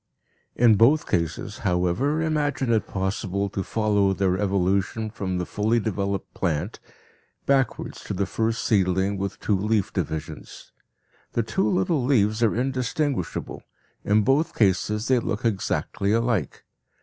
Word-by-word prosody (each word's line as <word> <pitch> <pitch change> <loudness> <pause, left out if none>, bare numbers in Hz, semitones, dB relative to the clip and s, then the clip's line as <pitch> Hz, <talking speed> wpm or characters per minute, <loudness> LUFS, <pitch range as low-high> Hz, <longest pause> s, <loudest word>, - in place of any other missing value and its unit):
In 115 -3 +5
both 135 +8 +4
cases, 85 -3 -2
however, 95 - 0
imagine 145 -5 0
it 110 - +1
possible 100 +1 -2
to 95 - -3
follow 105 -3 +1
their 95 -1 +1
evolution 100 +2 0
from 95 -4 -3
the 90 - -2
fully 110 +5 +1
developed 100 -2 -3
plant 80 -6 -2 0.7
backwards 135 -3 0
to 100 - -4
the 100 +1 0
first 115 +3 -1
seedling 95 -1 +2
with 100 0 -4
two 105 - +1
leaf 105 +1 0
divisions. 75 -6 -5 0.6
The 115 - +1
two 190 - 0
little 170 -6 +1
leaves 110 -4 +2
are 115 -3 +3
indistinguishable, 130 - -2 0.4
in 105 +1 +3
both 135 +7 +1
cases 105 +1 +1
they 130 -1 +4
look 115 0 -3
exactly 100 -1 -1
alike. 115 - 0
105 Hz, 135 wpm, -24 LUFS, 95-120 Hz, 0.7 s, In